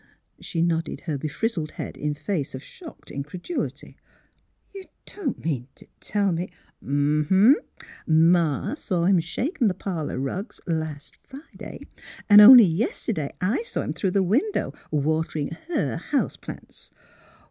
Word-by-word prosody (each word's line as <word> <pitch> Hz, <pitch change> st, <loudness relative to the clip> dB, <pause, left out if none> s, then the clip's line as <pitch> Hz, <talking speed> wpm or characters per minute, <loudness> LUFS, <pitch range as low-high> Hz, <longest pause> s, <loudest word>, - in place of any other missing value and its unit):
' -, -, -44 dB
' -, -, -35 dB
She 165 Hz, -1 st, 0 dB
nodded 165 Hz, -1 st, -1 dB
her 155 Hz, -4 st, -3 dB
befrizzled 155 Hz, -, -3 dB
head -, -, -6 dB
in 150 Hz, 0 st, -3 dB
face 150 Hz, -2 st, -3 dB
of 130 Hz, -, -8 dB
shocked 340 Hz, -4 st, -12 dB
incredulity. 175 Hz, -, -5 dB, 0.4 s
'' -, -, -42 dB
You 390 Hz, -1 st, -9 dB, 0.2 s
don't 315 Hz, -, -5 dB
mean 130 Hz, -6 st, -2 dB
t' -, -, -17 dB
tell 200 Hz, -2 st, 0 dB
me? 175 Hz, +2 st, -2 dB, 0.2 s
" -, -, -29 dB
'^ 145 Hz, +2 st, +1 dB
Uh 150 Hz, -, -4 dB
huh! 210 Hz, +9 st, +3 dB, 0.2 s
Ma 160 Hz, -, +3 dB
saw 185 Hz, -, -1 dB
him 190 Hz, -1 st, +4 dB
shakin' 240 Hz, -, -1 dB
the 185 Hz, -, 0 dB
parlour 170 Hz, -8 st, -4 dB
rugs 180 Hz, -, -4 dB
last 160 Hz, -4 st, -4 dB
Friday; 275 Hz, +4 st, -11 dB, 0.5 s
an' 205 Hz, -1 st, +9 dB
only 240 Hz, +1 st, +11 dB
yeste'day 170 Hz, -3 st, -2 dB
I 205 Hz, -, +1 dB
saw 475 Hz, +1 st, -4 dB
him -, -, -3 dB
through 195 Hz, -, -1 dB
the 195 Hz, +1 st, +2 dB
window 270 Hz, -, 0 dB, 0.2 s
waterin' 155 Hz, 0 st, -1 dB, 0.2 s
her 350 Hz, -, -1 dB
house -, -, -1 dB
plants! -, -, -10 dB
175 Hz, 155 wpm, -24 LUFS, 155-215 Hz, 0.5 s, only